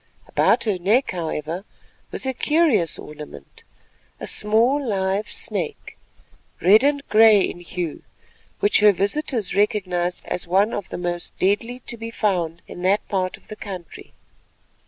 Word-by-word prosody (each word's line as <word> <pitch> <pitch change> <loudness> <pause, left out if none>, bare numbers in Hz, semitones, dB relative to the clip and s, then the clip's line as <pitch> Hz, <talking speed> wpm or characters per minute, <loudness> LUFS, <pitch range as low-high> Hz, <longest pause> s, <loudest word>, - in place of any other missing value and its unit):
About - - +3
her 205 -5 0
neck, 215 +9 +2
however, 165 0 -4 0.5
was - - -5
a 265 - -1
curious 270 - +2
ornament, 150 - -11 0.6
a - - -5
small 230 +7 +2
live 195 -3 -1
snake, - - -3 0.6
red 210 +6 +6
and 285 0 +1
grey 215 -2 +7
in 175 - -2
hue, 175 -2 -5 0.6
which 205 - +4
her 210 0 +6
visitors 215 - 0
recognised 185 -4 0
as 175 - -4
one 195 +5 +2
of 195 - -4
the - - -5
most 175 0 -4
deadly 230 +6 0
to 235 - -4
be 225 0 -6
found 175 -7 -1
in 175 - -9
that 195 +3 +1
part 185 -2 -1
of - - -26
the 215 - -8
country. 190 -5 -9
200 Hz, 145 wpm, -22 LUFS, 175-225 Hz, 0.6 s, grey